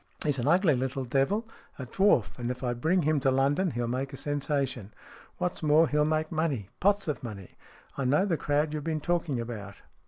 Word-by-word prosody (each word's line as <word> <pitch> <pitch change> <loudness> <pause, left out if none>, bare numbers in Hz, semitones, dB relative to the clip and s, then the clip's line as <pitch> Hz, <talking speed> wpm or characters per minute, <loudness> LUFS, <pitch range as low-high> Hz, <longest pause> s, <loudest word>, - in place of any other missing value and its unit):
He's 145 -3 +1
an 120 - -1
ugly 170 0 +4
little 130 +1 -2
devil, 135 - 0 0.3
a 130 - -6
dwarf, 130 - +2
and 120 0 -2
if 125 +1 -5
I 120 -1 0
bring 160 +9 +1
him 155 0 +2
to 135 - +2
London 140 +8 +2
he'll 120 -4 -2
make 130 +3 -3
a - - -6
sensation. 135 -7 -2 0.5
What's 180 - -2
more, 155 +1 +5
he'll 150 0 +2
make 155 0 0
money. 145 - -1
Pots 200 0 +2
of 150 -5 -2
money. 100 -6 -8 0.5
I 135 - 0
know 150 +9 +3
the 180 -5 +1
crowd 150 0 0
you've 150 -1 -3
been 160 0 -1
talking 165 -5 -1
about. 105 -4 -7
145 Hz, 205 wpm, -28 LUFS, 125-160 Hz, 0.5 s, more